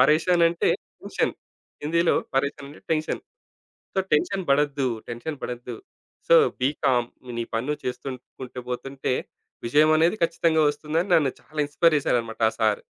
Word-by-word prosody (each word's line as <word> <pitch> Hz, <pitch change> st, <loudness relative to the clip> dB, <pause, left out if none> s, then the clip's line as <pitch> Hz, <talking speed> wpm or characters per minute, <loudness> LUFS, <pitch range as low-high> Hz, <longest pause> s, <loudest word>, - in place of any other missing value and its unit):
పరేషాన్ 160 Hz, +6 st, +4 dB
అంటే 170 Hz, 0 st, 0 dB, 0.3 s
టెన్షన్. -, -, -1 dB, 0.5 s
హిందీలో 170 Hz, +3 st, +2 dB, 0.2 s
పరేషాన్ 140 Hz, +1 st, -1 dB
అంటే 145 Hz, -, -15 dB
tension. 155 Hz, 0 st, -1 dB, 0.7 s
So, -, -, 0 dB
tension 190 Hz, +5 st, +2 dB
బడద్దు, 140 Hz, -1 st, +2 dB, 0.2 s
tension 125 Hz, +6 st, -5 dB
బడద్దు. 125 Hz, 0 st, -5 dB, 0.5 s
So, -, -, +8 dB, 0.2 s
be 130 Hz, -, +3 dB
com 120 Hz, -2 st, +3 dB, 0.3 s
నీ 115 Hz, -, -1 dB
పని 115 Hz, +4 st, -1 dB
నువు 150 Hz, -, -2 dB
చేస్తు 125 Hz, +2 st, -4 dB, 0.3 s
కుంటూ 125 Hz, -1 st, -6 dB
పోతుంటే, 135 Hz, +1 st, -2 dB, 0.5 s
విజయం 150 Hz, +5 st, +5 dB
అనేది 170 Hz, +6 st, +3 dB
ఖచ్చితంగా 165 Hz, -1 st, +2 dB
ఒస్తుందని 155 Hz, +5 st, -2 dB
నన్ను 140 Hz, -5 st, +2 dB
చాలా 155 Hz, -, -12 dB
ఇన్స్‌పైర్ 155 Hz, +2 st, +3 dB
చేసారన్నమాట 115 Hz, -4 st, -1 dB
ఆ -, -, -15 dB
సారు. 110 Hz, -1 st, +2 dB
145 Hz, 145 wpm, -25 LUFS, 125-160 Hz, 0.7 s, So